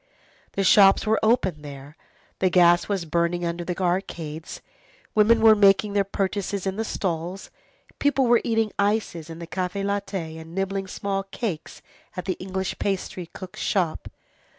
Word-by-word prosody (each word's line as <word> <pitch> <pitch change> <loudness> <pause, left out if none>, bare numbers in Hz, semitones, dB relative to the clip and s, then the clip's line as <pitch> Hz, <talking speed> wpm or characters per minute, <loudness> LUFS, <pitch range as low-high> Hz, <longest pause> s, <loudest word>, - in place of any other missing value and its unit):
The 195 - 0
shops 195 +1 +6
were 220 +1 +2
open 195 -9 +1
there, 140 0 -10 0.4
the 185 - +3
gas 175 0 +4
was 195 -4 -1
burning 170 +2 0
under 170 +1 -3
the 175 0 -4
arcades, 170 -4 -3 0.5
women 220 +2 +4
were 220 -1 +8
making 200 0 +4
their 200 -1 +3
purchases 195 0 -2
in 190 0 -1
the 220 - -2
stalls, 180 -2 -4 0.5
people 285 -2 +2
were 240 -1 +4
eating 225 -2 +1
ices 200 -6 0
in 165 - -8
the 170 - -7
Café 185 +3 -3
Laiter, 195 -5 -3
and 165 +2 -12
nibbling 195 0 -2
small 195 +1 -2
cakes 195 -4 -6 0.3
at 180 - -4
the 190 - 0
English 190 0 -4
pastry 185 -2 -3
cook's 185 +1 -10
shop. 180 -6 -1
190 Hz, 155 wpm, -24 LUFS, 170-200 Hz, 0.5 s, were